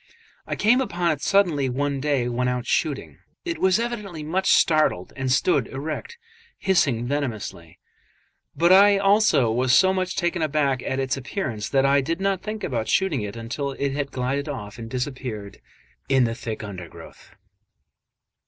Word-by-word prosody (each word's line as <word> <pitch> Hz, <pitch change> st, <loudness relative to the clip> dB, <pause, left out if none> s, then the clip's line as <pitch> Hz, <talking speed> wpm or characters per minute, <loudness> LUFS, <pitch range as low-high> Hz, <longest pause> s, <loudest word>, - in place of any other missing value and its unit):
I -, -, -2 dB
came 240 Hz, +5 st, +3 dB
upon 175 Hz, -8 st, 0 dB
it 145 Hz, -2 st, -3 dB
suddenly 170 Hz, -9 st, +2 dB
one 140 Hz, +2 st, -1 dB
day 140 Hz, -3 st, 0 dB
when 125 Hz, +1 st, -1 dB
out 125 Hz, -1 st, -2 dB
shooting. 145 Hz, +1 st, -2 dB, 0.3 s
It 340 Hz, -1 st, -3 dB
was 190 Hz, +1 st, +3 dB
evidently 210 Hz, -9 st, -4 dB
much 185 Hz, +5 st, 0 dB
startled, 155 Hz, -, +2 dB
and 135 Hz, -1 st, -2 dB
stood 135 Hz, -1 st, +2 dB
erect, 155 Hz, -, -6 dB, 0.4 s
hissing 150 Hz, -12 st, +1 dB
venomously; 120 Hz, -, -4 dB, 0.8 s
but 170 Hz, +2 st, +3 dB
I 200 Hz, +1 st, +7 dB
also 195 Hz, -, +3 dB
was 125 Hz, +2 st, +1 dB
so 190 Hz, +6 st, +5 dB
much 185 Hz, -1 st, -2 dB
taken 175 Hz, -2 st, -1 dB
aback 140 Hz, -4 st, +1 dB
at 130 Hz, -, -3 dB
its 135 Hz, 0 st, -1 dB
appearance 125 Hz, -, -4 dB
that 135 Hz, -1 st, +2 dB
I 140 Hz, +1 st, +4 dB
did 165 Hz, +6 st, -2 dB
not 195 Hz, -1 st, 0 dB
think 215 Hz, +1 st, -6 dB
about 115 Hz, -4 st, -2 dB
shooting 185 Hz, -, +1 dB
it 105 Hz, 0 st, -5 dB
until 130 Hz, +5 st, -4 dB
it 140 Hz, +1 st, -2 dB
had 140 Hz, 0 st, -3 dB
glided 135 Hz, +4 st, -2 dB
off 115 Hz, -5 st, -7 dB
and 115 Hz, -1 st, -7 dB
disappeared 125 Hz, -5 st, -5 dB, 0.5 s
in 135 Hz, -2 st, +4 dB
the 115 Hz, -1 st, 0 dB
thick 115 Hz, -3 st, -6 dB
undergrowth. 90 Hz, -5 st, -11 dB
140 Hz, 160 wpm, -24 LUFS, 125-180 Hz, 0.8 s, I